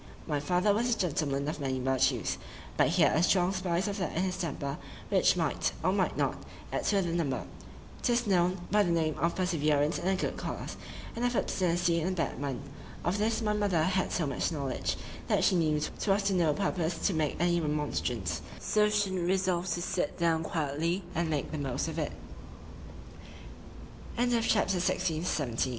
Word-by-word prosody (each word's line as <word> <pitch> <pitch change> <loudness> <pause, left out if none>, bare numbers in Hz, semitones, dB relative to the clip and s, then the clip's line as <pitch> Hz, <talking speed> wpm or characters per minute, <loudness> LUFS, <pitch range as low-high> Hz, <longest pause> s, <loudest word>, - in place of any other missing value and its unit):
My 150 -3 -1
father 180 +7 +2
was 235 +4 +1
a 235 - +2
gentleman 145 -5 0
of 150 - -3
many 135 -2 -1
virtues,—but 130 0 0
he - - +3
had - - +4
a 160 - +3
strong 180 +1 +3
spice 185 0 0
of 200 0 -3
that 180 -3 -2
in 180 - +2
his 185 -1 -1
temper, 150 -5 -3 0.3
which - - +4
might, - - 0
or - - +3
might - - 0
not, - - 0 0.4
add - - -1
to 200 -2 +3
the 170 -1 -2
number.—'Tis 175 - -3
known 180 -2 +2
by 210 +1 +5
the 190 - +2
name 160 -2 +1
of 170 +3 +1
perseverance 155 -5 +1
in - - -3
a 190 - +3
good - - -2
cause,—and 235 - -6
of 245 0 +1
obstinacy 175 -4 +1
in 160 - -1
a - - 0
bad 165 -5 -2
one: 140 -2 -3 0.4
Of 185 +4 0
this 225 +2 +1
my 210 -1 +1
mother 200 -6 +2
had 185 +2 +1
so 170 - 0
much 140 +4 -1
knowledge, 140 -5 -2 0.3
that - - +2
she - - +4
knew 155 -3 +2
'twas 195 +6 0
to 195 0 +1
no 170 -4 +3
purpose 175 -4 -1
to 200 - +3
make 155 -3 0
any 175 0 +2
remonstrance,—so 150 - -1
she 205 -2 +1
e'en 180 -2 -1
resolved 185 -1 +1
to 175 - -3
sit 180 -5 -1
down 165 -1 +2
quietly, 160 +4 -1
and 170 -2 0
make 150 -3 -1
th 155 -2 -3
175 Hz, 170 wpm, -30 LUFS, 150-190 Hz, 0.4 s, by